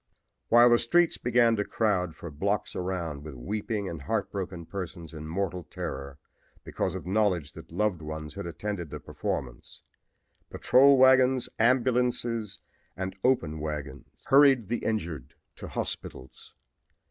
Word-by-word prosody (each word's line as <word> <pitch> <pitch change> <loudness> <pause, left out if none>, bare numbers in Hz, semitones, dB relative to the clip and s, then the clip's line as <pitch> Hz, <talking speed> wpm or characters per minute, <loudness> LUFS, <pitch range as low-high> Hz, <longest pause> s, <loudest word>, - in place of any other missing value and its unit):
"While 120 +1 +7
the 120 - +5
streets 170 +8 +2
began 120 -1 +3
to 105 - +1
crowd 95 -7 0
for 85 - -8
blocks 100 +8 -2
around 85 -6 -3
with 75 -3 -8
weeping 100 - -3
and 80 -5 -6
heartbroken 95 0 -3
persons 85 -3 -7
in 80 -1 -7
mortal 90 0 -3
terror 70 0 -6 0.5
because - - -2
of - - -6
knowledge 95 -6 0
that - - -12
loved 105 -6 0
ones 75 0 -6
had - - -6
attended 85 0 -4
the - - -7
performance, - - -5 0.7
patrol 140 +2 +5
wagons, 130 -1 +5
ambulances 120 -2 +1 0.4
and 95 0 -4
open 85 -12 +1
wagons 75 -1 -7
hurried 135 -6 +5
the 120 - 0
injured 85 - -3 0.2
to - - -8
hospitals. 65 - -6
95 Hz, 135 wpm, -28 LUFS, 80-120 Hz, 0.7 s, While